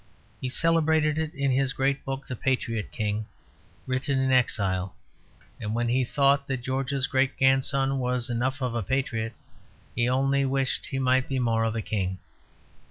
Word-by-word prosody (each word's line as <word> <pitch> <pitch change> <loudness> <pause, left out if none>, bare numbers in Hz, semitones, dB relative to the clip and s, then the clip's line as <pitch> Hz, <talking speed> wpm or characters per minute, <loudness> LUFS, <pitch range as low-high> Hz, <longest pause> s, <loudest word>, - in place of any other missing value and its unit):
He 130 - -2
celebrated 160 0 +2
it 160 -1 -2
in 140 -1 +1
his 135 +1 +1
great 135 0 0
book 135 0 -4
"The 130 - -5
Patriot 115 -4 -1
King," 105 -1 -2 0.6
written 130 +2 -1
in 130 0 +1
exile; 95 -7 +1 0.6
and 110 0 -3
when 120 0 0
he 130 +2 +2
thought 140 +2 +2
that 130 -3 -3
George's 135 +1 -1
great 135 -1 +1
grandson 135 0 +2
was 125 -1 0
enough 130 +3 -1
of 125 -2 -1
a 120 - -1
patriot, 115 0 -1 0.6
he 120 +1 +2
only 135 +2 +2
wished 135 -1 0
that - - -2
he 135 - -3
might 130 0 +2
be 135 - -1
more 115 -3 +1
of 110 0 -1
a 110 - -2
king. 95 -3 -2
130 Hz, 170 wpm, -26 LUFS, 120-135 Hz, 0.6 s, celebrated